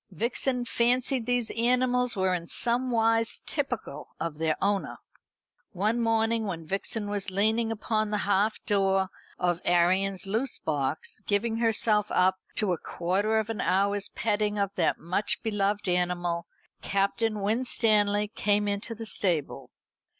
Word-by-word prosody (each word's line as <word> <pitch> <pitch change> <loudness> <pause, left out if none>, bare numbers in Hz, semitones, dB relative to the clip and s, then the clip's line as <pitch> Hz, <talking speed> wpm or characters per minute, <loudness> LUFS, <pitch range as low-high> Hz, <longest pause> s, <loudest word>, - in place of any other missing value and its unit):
Vixen 245 - -1
fancied 245 +2 +1
these 245 -2 0
animals 250 +1 +2
were 190 -1 +1
in 170 -1 -2
some 245 +5 +1
wise 225 -1 +1
typical 245 - -4
of 160 -2 -4
their 160 -1 +1
owner. 200 0 -1 0.8
One 210 +5 0
morning 225 -1 +1
when 165 -4 -5
Vixen 200 +4 -3
was 205 -1 -2
leaning 220 +4 +1
upon 215 0 -1
the 210 - 0
half 205 +2 +2
door 195 -2 +2 0.3
of 175 -1 0
Arion's 185 +3 +2
loose 225 +6 -2
box, 145 +2 -2
giving 220 +2 0
herself 220 -2 +2
up 185 +1 +2 0.2
to 205 -4 +1
a 170 - -4
quarter 195 +6 -1
of 220 0 -1
an 220 - -3
hour's 200 +2 +1
petting 210 -1 -1
of 200 -1 0
that 170 -4 +1
much 185 +5 -1
beloved 205 -2 -1
animal, 175 -1 -1 0.3
Captain 210 +2 0
Winstanley 210 -1 +2
came 205 -1 +1
into 205 +3 -3
the 225 +1 -7
stable. 175 -8 0
205 Hz, 140 wpm, -27 LUFS, 190-225 Hz, 0.8 s, animals